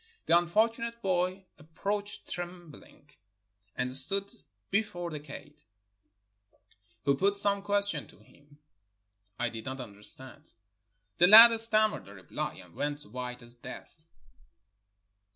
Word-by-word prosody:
The 170 - +3
unfortunate 225 +7 0
boy 185 0 -1
approached 200 +7 -5
trembling, 175 -4 -10 0.6
and 125 0 -1
stood 195 +9 +6 0.4
before 195 -4 -2
the 150 - -6
kaid, 150 +1 -13 1.4
who 140 0 +3
put 200 +6 +1
some 200 0 +1
question 200 -6 -1
to - - -19
him 145 0 -23 0.8
I 120 0 -2
did 115 -1 -9
not 130 +1 -6
understand. 130 +6 -10 0.7
The 175 - +6
lad 230 +3 +10
stammered 215 - +2
a 100 - -13
reply, 90 -3 -6
and 90 -2 -20
went 145 +4 -4
white 125 -2 -8
as 120 0 -15
death. 120 - -13
170 Hz, 115 wpm, -29 LUFS, 135-200 Hz, 1.4 s, lad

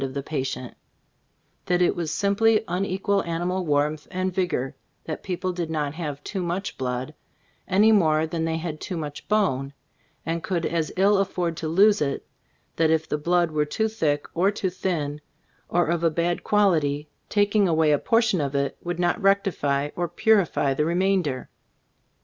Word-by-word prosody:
of - - 0
A* - - -7
Cbf - - -11
Iftbooft - - -5
of 140 - -3
the - - -16
patient; 130 -4 -3 0.9
that 180 0 +2
it - - +2
was 165 -3 -3
simply 215 +4 +2
un 180 +3 -1
equal 195 +1 0
animal 175 +2 -2
warmth 150 +1 0
and 185 0 -2
vigor 175 -8 -1 0.2
— - - -44
that 155 - -5
people 185 0 -3
did 175 -2 -3
not 150 -3 -2
have 150 -4 -5
too 195 - -4
much 180 +3 -3
blood 125 +3 -3 0.6
anv 210 +4 +5
more 160 -6 +3
than 160 0 -3
thev 160 0 -1
had 160 -2 -5
too 185 - -4
much 150 -2 -6
bone, 140 -11 +1 0.5
and 165 +1 -2
could 175 -2 -2
as 165 -2 -1
ill 195 +1 +4
afford 180 -3 -1
to 160 - -3
lose 200 +5 +4
it; 140 -2 -1 0.5
that 160 -1 +3
if 160 0 +1
the 150 - -2
blood 175 +1 +2
were 150 -1 +1
too 220 +9 -1
thick, 155 -10 -1
or 180 +4 +3
too 200 -3 -2
thin, 150 -6 -2 0.5
or 175 0 +2
of 170 0 -1
a 165 - +5
bad 170 +2 -1
quality, 155 -8 +2 0.2
tak 205 0 +1
ing 205 -2 +5
away 160 -2 +3
a 145 - +3
portion 225 -6 +2
of 140 -1 -2
it 140 0 -1
would 175 -1 -3
not 175 +5 0
rectify 170 -8 +1
or 175 0 -1
purify 175 -7 +2
the 150 - 0
remainder. 175 -5 0
170 Hz, 190 wpm, -25 LUFS, 150-190 Hz, 0.9 s, anv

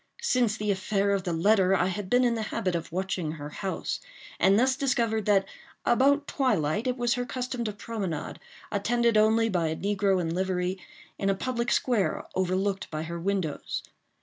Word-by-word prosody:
Since 245 - +2
the 210 -1 0
affair 200 +1 0
of 195 -2 0
the 175 - -1
letter, 190 +2 +3
I 180 - +2
had 190 +1 -3
been 250 +1 +4
in 240 -1 +3
the 225 - -2
habit 185 -2 -1
of 170 -1 -3
watching 180 -3 -2
her 145 -2 -7
house, 190 +5 -3 0.4
and 195 +1 +5
thus 260 +3 +3
discovered 230 -6 0
that, 195 -2 +4 0.4
about 280 +4 +4
twilight, 215 - 0
it 250 0 0
was 240 -1 +1
her 245 - -1
custom 250 0 -3
to 215 - -1
promenade, 205 -5 -4 0.3
attended 235 +3 +1
only 220 +1 +4
by 175 -6 0
a 160 - -1
negro 200 0 +1
in 165 -2 -1
livery, 185 0 -1 0.4
in 195 - +1
a 195 - +2
public 235 +2 -2
square 205 -11 +1
overlooked 190 +2 0
by 155 0 -3
her 170 +1 -5
windows. 185 -4 -2
200 Hz, 180 wpm, -27 LUFS, 185-235 Hz, 0.4 s, and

